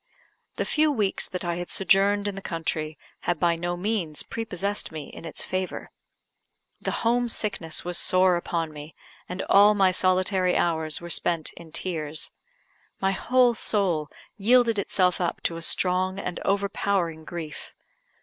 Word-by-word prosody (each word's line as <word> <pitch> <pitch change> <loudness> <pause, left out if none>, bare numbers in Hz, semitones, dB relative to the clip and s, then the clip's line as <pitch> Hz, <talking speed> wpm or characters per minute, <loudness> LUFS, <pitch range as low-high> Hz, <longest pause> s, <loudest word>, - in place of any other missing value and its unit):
The - - -2
few 310 0 +2
weeks 210 -8 0
that 180 -1 -4
I 170 0 -1
had 175 0 -5
sojourned 200 +2 +3
in 205 - -2
the 195 - -7
country 160 -3 -3 0.2
had 175 -3 -2
by 170 0 +2
no 175 +1 -3
means 180 -6 -2
prepossessed 205 -3 -3
me 155 -2 -7
in - - -11
its 165 - -4
favour. 185 0 -4 0.9
The - - -2 0.2
home 240 +1 +2
sickness 175 -9 -1
was 175 -1 +1
sore 185 0 +4
upon 165 -2 -2
me, 150 +1 -10 0.3
and 180 +1 -4
all 205 +1 +6
my 190 -2 +4
solitary 185 0 +2
hours 160 -2 +1
were 170 0 -6
spent 165 -2 +1
in 170 -2 -13
tears. 155 -4 0 0.7
My 195 0 +1
whole 245 +4 +3
soul 185 -9 0 0.3
yielded 230 +1 +4
itself 185 -2 +1
up 175 - -1
to 165 - -1
a 165 - -6
strong 185 +2 +1
and 180 -3 -4
overpowering 195 -4 0
grief. 160 -2 -8
185 Hz, 155 wpm, -25 LUFS, 165-200 Hz, 0.9 s, all